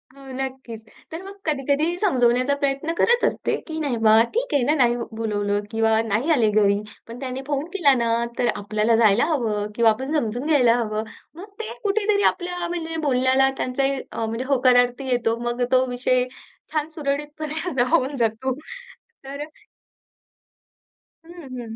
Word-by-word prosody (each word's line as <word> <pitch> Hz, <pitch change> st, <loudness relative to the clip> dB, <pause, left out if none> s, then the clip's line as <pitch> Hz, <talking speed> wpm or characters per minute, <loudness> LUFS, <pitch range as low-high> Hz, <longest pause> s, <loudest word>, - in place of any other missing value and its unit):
हो 275 Hz, -, -14 dB
नक्कीच. 260 Hz, -4 st, -6 dB, 0.3 s
तर 325 Hz, +3 st, -6 dB
मग 395 Hz, +1 st, -10 dB
कधी-कधी 300 Hz, +3 st, 0 dB
समजवण्याचा 255 Hz, -, +2 dB
प्रयत्न 280 Hz, +4 st, 0 dB
करत 480 Hz, 0 st, +3 dB
असते -, -, 0 dB
की 315 Hz, -1 st, -5 dB
"नाही 280 Hz, -6 st, -1 dB
बा, 215 Hz, 0 st, +7 dB, 0.2 s
ठीक -, -, -1 dB
आहे 280 Hz, -, +3 dB
ना. 290 Hz, +5 st, +2 dB
नाही 240 Hz, -4 st, +3 dB, 0.2 s
बोलावलं 205 Hz, -2 st, -1 dB
किंवा 225 Hz, 0 st, +1 dB, 0.2 s
नाही 230 Hz, +10 st, 0 dB
आले 235 Hz, -8 st, +3 dB
घरी. 205 Hz, -1 st, +3 dB, 0.3 s
पण 230 Hz, +1 st, -9 dB
त्यांनी 260 Hz, 0 st, -5 dB
फोन 285 Hz, 0 st, -1 dB
केला 300 Hz, -8 st, +4 dB
ना? 235 Hz, -, +1 dB, 0.3 s
तर 245 Hz, -, +2 dB
आपल्याला 215 Hz, +2 st, +1 dB
जायला 220 Hz, +1 st, +4 dB
हवं. 225 Hz, -10 st, -1 dB
किंवा 230 Hz, -1 st, +5 dB
आपण 265 Hz, +7 st, -4 dB
समजून 240 Hz, 0 st, -2 dB
घ्यायला 250 Hz, -7 st, +4 dB
हवं." 215 Hz, -2 st, -2 dB, 0.3 s
मग 355 Hz, +4 st, -9 dB
ते 445 Hz, -, -5 dB
कुठेतरी 410 Hz, 0 st, +1 dB
आपल्या 355 Hz, -1 st, -5 dB
म्हणजे 330 Hz, -2 st, -4 dB
बोलण्याला 260 Hz, +1 st, +3 dB
त्यांचाही 270 Hz, +1 st, -1 dB
अ, 225 Hz, -, -3 dB
म्हणजे 230 Hz, +3 st, -3 dB
होकारार्थी 250 Hz, -1 st, +3 dB
येतो. 230 Hz, -2 st, +1 dB
मग 240 Hz, +1 st, -1 dB
तो 255 Hz, 0 st, +4 dB
विषय 250 Hz, 0 st, +1 dB, 0.5 s
छान 310 Hz, 0 st, -1 dB
सुरळीतपणे 295 Hz, +1 st, -3 dB
हा 360 Hz, -, -2 dB
जा 245 Hz, -, +5 dB
होऊन 270 Hz, +2 st, +1 dB
जातो. 230 Hz, +4 st, -1 dB, 0.7 s
तर 275 Hz, +1 st, -7 dB
अ, -, -, -3 dB, 1.8 s
हं, 335 Hz, -, -13 dB, 0.3 s
हं. 225 Hz, -2 st, -7 dB
260 Hz, 165 wpm, -23 LUFS, 230-300 Hz, 1.8 s, बा